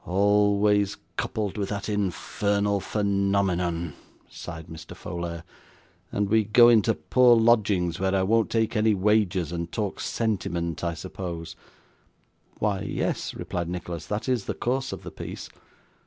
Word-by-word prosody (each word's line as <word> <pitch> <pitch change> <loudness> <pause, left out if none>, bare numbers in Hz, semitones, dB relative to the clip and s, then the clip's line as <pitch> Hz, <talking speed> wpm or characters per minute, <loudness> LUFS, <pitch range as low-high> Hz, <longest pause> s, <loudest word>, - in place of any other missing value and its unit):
'Always 100 +1 +3 0.2
coupled 105 -1 -2
with 100 - -2
that 100 -1 -4
infernal 100 0 0
phenomenon,' 100 -5 0 0.3
sighed 80 -2 -8
Mr. 80 -1 -10
Folair; 85 -1 -5 0.7
'and 100 0 0
we 110 +2 +3
go 120 +3 +6
into 115 -1 +4
poor 125 -2 +5
lodgings, 105 -7 +3
where 95 0 +1
I 95 - +2
won't 110 +3 +2
take 115 0 0
any 110 0 +3
wages, 95 -4 +1
and 85 -1 -4
talk 105 -4 -3
sentiment, 85 -7 -2
I 85 -1 -1
suppose?' 85 -1 -6 1.0
'Why 105 -3 0
yes,' 105 - -2
replied 85 -1 -4
Nicholas: 85 -2 -5
'that 105 +6 -3
is 125 -5 0
the - - -3
course 130 +2 -1
of - - -7
the - - -7
piece. - - -7
100 Hz, 140 wpm, -26 LUFS, 90-105 Hz, 1.0 s, go